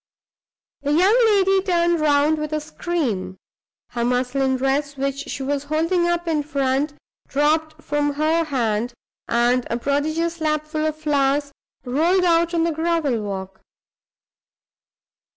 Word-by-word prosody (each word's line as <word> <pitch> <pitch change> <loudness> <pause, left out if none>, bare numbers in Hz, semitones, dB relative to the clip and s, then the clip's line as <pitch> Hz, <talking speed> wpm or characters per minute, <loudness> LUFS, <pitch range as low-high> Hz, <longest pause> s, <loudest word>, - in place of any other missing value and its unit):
The 290 +1 0
young 370 +8 +4
lady 390 -2 +3
turned 345 -3 +1
round, 300 +1 +3
with 305 0 -4
a 305 - +1
scream; 280 - -3 0.5
her 235 - -3
muslin 255 +2 +1
dress, 275 +2 -1
which 275 +1 -3
she 270 - -4
was 285 +1 -2
holding 330 +4 +1
up 345 0 -1
in 315 -2 +1
front, 280 0 -1 0.3
dropped 310 +2 0
from 290 0 0
her 315 +3 +1
hand, 240 -4 -1 0.3
and 240 +1 +2
a 235 - -1
prodigious 315 +6 -1
lapful 305 0 -1
of 310 - -2
flowers 285 -2 +1 0.3
rolled 330 +9 +2
out 340 0 +2
on 330 - +2
the 335 - +1
gravel 320 -7 0
walk. 195 -2 -6
295 Hz, 135 wpm, -22 LUFS, 270-330 Hz, 0.5 s, young